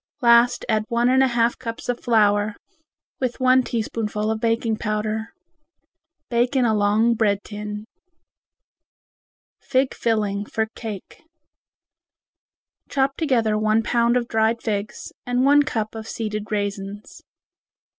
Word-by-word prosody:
Last 235 +1 +5
add 215 -1 +1
one 240 0 +1
and 260 +1 +4
a 265 - +5
half 235 -1 +1
cups 230 -2 -6
of 245 -1 -1
flour 210 -2 +2 0.6
with 255 -1 -2
one 255 0 +5
teaspoonful 220 -2 -2
of 220 - -2
baking 230 -1 0
powder. 215 +1 -2 1.0
Bake 240 +3 0
in 255 -2 +3
a 220 - +2
long 210 +3 +3
bread 205 -3 +1
tin. 210 0 -7 1.7
Fig 260 -1 0
Filling 210 -3 -1
for 220 - -1
Cake 215 -5 -8 1.7
Chop 275 0 +1
together 235 -9 +1
one 215 +1 +2
pound 235 +1 +2
of 240 -1 -2
dried 225 +1 +1
figs 210 -2 -4 0.2
and 245 +1 +1
one 290 +1 +6
cup 220 -6 -2
of 220 0 -7
seeded 215 -1 -4
raisins. 205 0 -4
225 Hz, 125 wpm, -22 LUFS, 210-240 Hz, 1.7 s, one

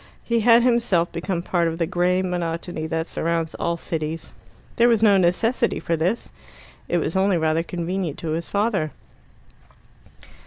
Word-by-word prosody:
He 235 -1 +1
had 230 +1 +5
himself 230 -9 +2
become 170 0 -3
part 175 -2 +1
of 165 0 -3
the 165 - +1
grey 180 +2 +1
monotony 170 -2 -3
that 160 0 -2
surrounds 165 -1 -2
all 170 0 -2
cities. 160 -1 -4 0.4
There 235 - +5
was 225 -2 +3
no 205 -2 +6
necessity 225 +7 +1
for 165 - -1
this 180 +8 -1 0.6
it 175 - +2
was 165 0 -1
only 190 -1 +3
rather 160 0 +1
convenient 175 -1 -3
to 160 - -4
his 165 +2 -3
father. 200 -7 0
175 Hz, 155 wpm, -23 LUFS, 165-200 Hz, 0.6 s, no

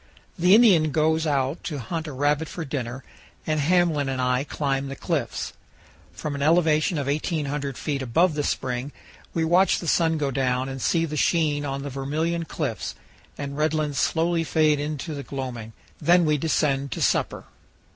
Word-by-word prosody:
The 180 +3 +5
Indian 190 -10 +6
goes 160 +2 +1
out 140 +1 0
to 150 - -3
hunt 160 +5 -4
a - - -5
rabbit 145 +3 0
for 165 0 -6
supper, 130 -2 -4 0.4
and 155 -1 0
Hamblin 160 -2 +2
and 130 -1 -2
I 125 +1 +1
climb 140 -1 -2
the 135 - -6
cliffs. - - -3 0.6
From 150 - -5
an 140 - -4
elevation 160 +1 +3
of 140 - -1
1,800 145 -2 -2
feet 140 -3 -2
above 155 +8 +2
the 150 - -1
spring 130 -1 -2 0.4
we 165 -1 +1
watch 180 +4 +4
the 170 - -6
sun 160 0 +2
go 145 -2 -1
down 130 0 0
and 135 -1 -6
see 165 +5 +2
the 150 -1 -4
sheen 150 -3 +1
on 140 0 -3
the 140 - -5
Vermilion 155 +5 -2
Cliffs 115 - -4 0.4
and 140 -1 -5
red 155 +1 +1
lands 150 -3 -1
slowly 165 +1 +1
fade 155 0 +2
into 150 +2 -4
the 140 - -5
gloaming; 125 -5 -6 0.3
then 175 0 +5
we 150 -1 +3
descend 140 -3 0
to - - -5
supper. - - 0
150 Hz, 175 wpm, -24 LUFS, 135-160 Hz, 0.6 s, Indian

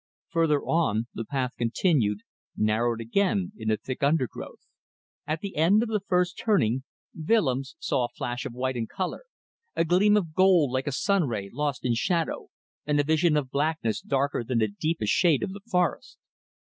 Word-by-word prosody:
Further 160 -4 +2
on, 115 -10 +1
the 115 - -4
path 130 0 -2
continued, 115 - +1 0.4
narrowed 115 +2 +1
again 190 - 0
in 110 - -7
the 110 -1 +2
thick 125 +4 -6
undergrowth. 140 -3 -1 0.7
At 155 +1 -2
the 200 -1 -6
end 185 +8 +4
of 235 - -4
the 215 -1 0
first 180 -2 0
turning 135 - +2 0.3
Willems 155 - 0
saw 130 -5 0
a - - -6
flash 120 0 -3
of - - -6
white 130 +1 -2
and 115 -2 -3
colour, 185 - -4 0.5
a 165 - +2
gleam 200 +5 +4
of 170 -6 -2
gold 180 -6 +4
like 130 +2 -2
a - - 0
sun 190 +4 +1
ray 100 -5 -4
lost 145 -1 -2
in 120 - +2
shadow, 165 +7 -1 0.4
and 145 0 +1
a - - +4
vision 155 +1 +2
of 135 -3 -2
blackness 145 -6 -1
darker 140 -2 0
than 120 +1 -2
the 110 -1 +3
deepest 110 +1 -1
shade 165 -7 +3
of 190 - -3
the 200 - -9
forest. 180 -5 0
145 Hz, 180 wpm, -26 LUFS, 120-175 Hz, 0.7 s, end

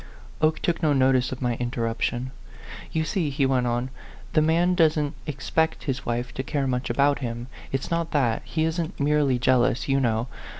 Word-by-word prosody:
Oke 155 0 +3
took 175 0 -1
no 155 -3 +3
notice 130 -1 +3
of 130 0 -5
my 120 -1 +1
interruption. 120 +1 -2 0.3
" - - -13
You 160 - 0
see," 160 -1 -1
he 140 0 +1
went 130 -2 +2
on, 120 +2 -1 0.2
" 125 - -19
the 155 - +4
man 170 +3 +3
doesn't 155 -4 +2
expect 155 +3 -1
his 135 -3 -3
wife 120 +1 -2
to - - -3
care 140 +1 -1
much 125 -1 -1
about 140 0 +2
him. 120 -2 -4 0.3
It's 135 +4 -3
not 170 -1 0
that; 125 -6 +1
he 160 - -1
isn't 160 +2 -2
merely 145 -2 +2
jealous, 125 +1 +2
you 135 0 +2
know. 115 -2 0
135 Hz, 190 wpm, -25 LUFS, 125-155 Hz, 0.3 s, the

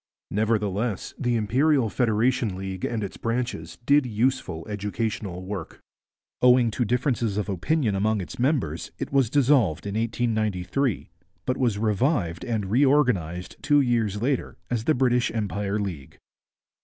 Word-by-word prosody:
Nevertheless 105 0 -1
the 120 -2 +1
Imperial 130 +4 +2
Federation 115 -1 +1
League 95 -1 -5
and 110 -3 -1
its 100 - -6
branches 115 -8 -3
did 140 -1 +4
useful 110 -8 -1
educational 105 -2 -3
work. 95 -4 -6 0.6
Owing 125 -2 +5
to 120 - 0
differences 120 -3 0
of 105 - -1
opinion 110 - 0
among 105 +2 +1
its 90 0 -7
members 120 - 0
it - - -5
was 135 -5 +3
dissolved 125 - +3
in 100 - -3
1893, 110 0 -1 0.3
but 130 - 0
was 120 -6 +1
revived 105 - 0
and 105 -5 -2
reorganized 120 - +2
two 145 -1 +4
years 115 -6 +1
later 130 +3 -1
as 115 -2 -1
the 155 - +3
British 125 -1 +2
Empire 105 -1 -1
League. 90 -10 -5
110 Hz, 135 wpm, -25 LUFS, 100-125 Hz, 0.6 s, Owing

